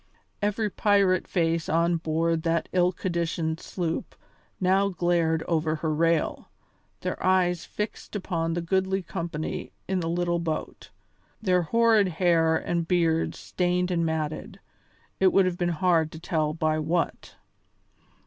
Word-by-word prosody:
Every 210 +1 0
pirate 200 -3 +2
face 165 -2 0
on 170 +1 +2
board 165 0 0
that 165 0 0
ill 180 -1 +3
conditioned 170 -3 -2
sloop 170 -4 -4 0.4
now 190 +2 +3
glared 170 -3 +1
over 160 -2 0
her 155 0 -2
rail, 165 +1 0 0.5
their - - -4
eyes 180 -2 +2
fixed 210 0 -5
upon 165 -4 -1
the 175 - -2
goodly 190 +2 0
company 170 -3 -4 0.2
in 190 -1 0
the 165 -2 -2
little 175 0 0
boat, 165 -2 -4 0.5
their 185 -4 +2
horrid 225 +3 +3
hair 165 -2 +2
and 170 0 -2
beards 165 -2 +1
stained 180 0 -1
and 170 -1 +1
matted 160 -1 -3 0.6
it 190 - +5
would 195 - +4
have 180 -1 -2
been 175 -1 +1
hard 165 -2 +2
to 160 - -8
tell 160 -3 0
by 155 -1 +1
what. 165 +3 -2
170 Hz, 140 wpm, -26 LUFS, 165-185 Hz, 0.6 s, it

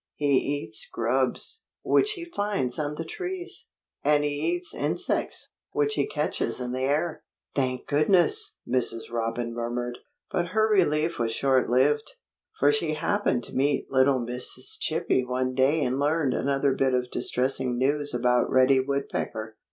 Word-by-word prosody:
"He 145 -2 +3 0.2
eats 110 0 -6
grubs, 130 - -1 0.2
which 420 +1 +3
he 345 -4 -7
finds 205 - -2
on 150 0 -2
the 165 - -5
trees. 365 - -5 0.4
And 145 0 +3
he 145 +3 0
eats 175 0 -4
insects, 155 - -2 0.2
which 435 0 +1
he - - 0
catches - - -2
in 125 -1 -3
the 130 +1 -2
air." 150 +5 0 0.3
"Thank 130 -2 -1
goodness!" 155 +4 +3
Mrs. 120 -3 -2
Robin 115 0 -2
murmured. 120 +1 -3 0.3
But 175 -2 0
her 220 0 +4
relief 170 - +2
was 115 -1 0
short 130 -1 +2
lived. 145 +4 +2 0.4
For 145 +1 +4
she 155 +1 0
happened 205 -7 0
to - - -10
meet 140 +1 +1
little 130 0 +4
Mrs. 125 +1 -3
Chippy 160 -5 +1
one 130 +1 -1
day 140 +4 +3
and 130 +2 -1
learned 145 -2 +1
another 135 +1 +1
bit 130 -1 +2
of 125 0 -1
distressing 125 -1 -1
news 145 +3 +1
about 125 0 +2
Reddy 130 +1 +5
Woodpecker. 130 -5 -3
135 Hz, 150 wpm, -26 LUFS, 125-155 Hz, 0.4 s, Reddy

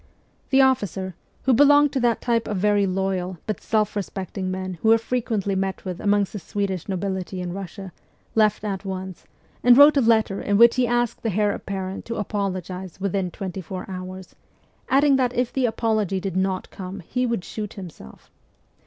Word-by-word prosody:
The 270 0 +5
officer, 200 -8 0 0.3
who 265 - +3
belonged 290 +2 +6
to 270 - -1
that 240 -2 +1
type 235 -2 0
of 210 - -2
very 205 +1 +2
loyal 185 -1 -2
but 215 - -3
self 215 -2 0
respecting 190 -1 -4
men 185 -2 -4
who 220 - +4
are 225 - +7
frequently 225 -4 -1
met 190 0 -2
with 185 -2 -5
amongst 205 -1 +1
the 205 - -4
Swedish 195 0 -3
nobility 190 -1 -3
in 180 -1 -4
Russia, 195 0 -7 0.4
left 215 -2 +2
at 200 -2 -3
once, 190 -2 -6 0.4
and 245 0 +7
wrote 290 +1 +8
a - - +5
letter 220 -4 +2
in 200 0 +1
which 235 +2 +6
he 250 -1 +3
asked 240 -1 0
the 225 -4 -1
heir 210 +1 +2
apparent 190 -1 -5
to 230 - -4
apologize 190 -4 -4
within 195 -1 -1
twenty 190 +1 -6
four 185 +1 -6
hours, 185 0 -8 0.6
adding 275 +1 +4
that 250 -2 +1
if 245 0 0
the 260 -2 +2
apology 215 -4 0
did 190 -1 -4
not 190 0 -1
come 190 +1 -7
he 250 +8 -1
would 230 -6 -2
shoot 210 -2 -6
himself. 170 - -11
200 Hz, 180 wpm, -23 LUFS, 185-230 Hz, 0.6 s, wrote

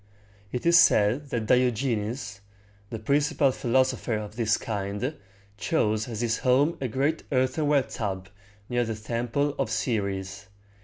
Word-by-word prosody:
It 125 - -4
is 170 0 +7
said 120 +7 +4
that 115 -4 -2
Diogenes, 120 -3 0 0.5
the 115 - -4
principal 140 +4 +2
philosopher 130 -1 +1
of 105 0 -7
this 110 -3 +2
kind, 105 +6 -3 0.4
chose 110 -4 0
as 115 -2 -4
his 115 -2 0
home 140 +6 +3
a 130 - 0
great 140 +7 0
earthenware 135 +2 +2
tub 95 -6 -4 0.4
near 120 0 0
the 115 -1 -3
Temple 120 +6 -1
of - - 0
Ce´res. 100 -3 -2
120 Hz, 135 wpm, -26 LUFS, 105-135 Hz, 0.5 s, is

